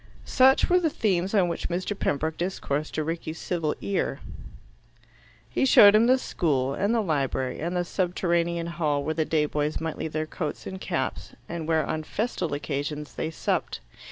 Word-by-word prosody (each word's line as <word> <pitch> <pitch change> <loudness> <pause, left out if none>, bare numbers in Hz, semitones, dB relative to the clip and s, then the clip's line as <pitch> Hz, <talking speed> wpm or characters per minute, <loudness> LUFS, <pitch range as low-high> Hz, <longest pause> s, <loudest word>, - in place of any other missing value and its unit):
Such 265 +1 +5
were 360 0 +4
the 330 -3 +1
themes 195 - 0
on 190 -3 +4
which 170 - -3
Mr. 180 +3 -2
Pembroke 155 -3 -1
discoursed 155 -4 -3
to 155 - 0
Rickie's 165 0 -4
civil 165 -4 -2
ear. 200 - -1 1.3
He - - -1
showed 205 -6 +8
him 220 +2 +5
the 255 +1 +5
school, 140 - 0
and 200 +8 0
the 230 -1 +2
library, 140 -7 -1
and 175 +3 -2
the 175 - 0
subterranean 170 -2 0
hall 155 -4 -1
where 155 +2 -1
the 160 -1 0
day 155 -1 +1
boys 150 0 -1
might 160 -1 -4
leave 160 - -4
their 155 0 -1
coats 155 -1 -5
and 190 0 -6
caps, 150 -8 -3
and 165 -2 -5
where, 160 -2 +2
on 155 - -2
festal 190 +1 -2
occasions, 145 +1 -4
they 160 - -3
supped. 160 - -2
165 Hz, 180 wpm, -26 LUFS, 155-185 Hz, 1.3 s, showed